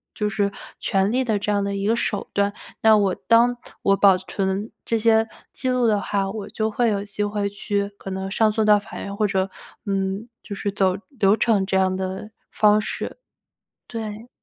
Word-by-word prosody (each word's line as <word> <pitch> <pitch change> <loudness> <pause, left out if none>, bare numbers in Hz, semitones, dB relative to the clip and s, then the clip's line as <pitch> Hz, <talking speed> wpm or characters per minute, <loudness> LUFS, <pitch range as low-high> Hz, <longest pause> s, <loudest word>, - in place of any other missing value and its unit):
就 210 -1 0
是 200 0 0 0.3
权 195 +2 +1
利 260 +2 +2
的 220 -3 +1
这 210 +1 -1
样 205 -1 +2
的 200 0 -2
一 195 0 -2
个 225 - +3
手 205 -3 -1
段。 200 0 +1 0.3
那 220 -1 +7
我 195 -2 +2
当 240 +1 +3 0.2
我 195 0 +3
保 195 -2 +6
存 190 +3 -3
这 230 - +1
些 225 0 +3 0.3
记 260 - -2
录 250 -1 +2
的 210 -2 +3
话， 195 -1 -1
我 210 -1 -6
就 220 0 -1
会 235 +1 +2
有 200 -2 -1
机 205 0 -3
会 205 -1 -1
去 200 0 -2
可 195 - -8
能 190 0 -4
上 220 +1 +3
诉 220 +1 +1
到 210 -1 +6
法 205 +2 -10
院， 200 - -5
或 210 -1 +2
者， 190 -1 0 0.4
嗯， 195 +3 -2
就 205 - -7
是 200 0 -2
走 190 -2 +2 0.2
流 200 0 +5
程 215 -3 +2
这 190 - -1
样 190 0 +2
的 190 +3 -4 0.2
方 210 0 +4
式。 215 - -4 0.7
对。 220 0 -6
205 Hz, 215 characters per minute, -23 LUFS, 195-220 Hz, 0.7 s, 那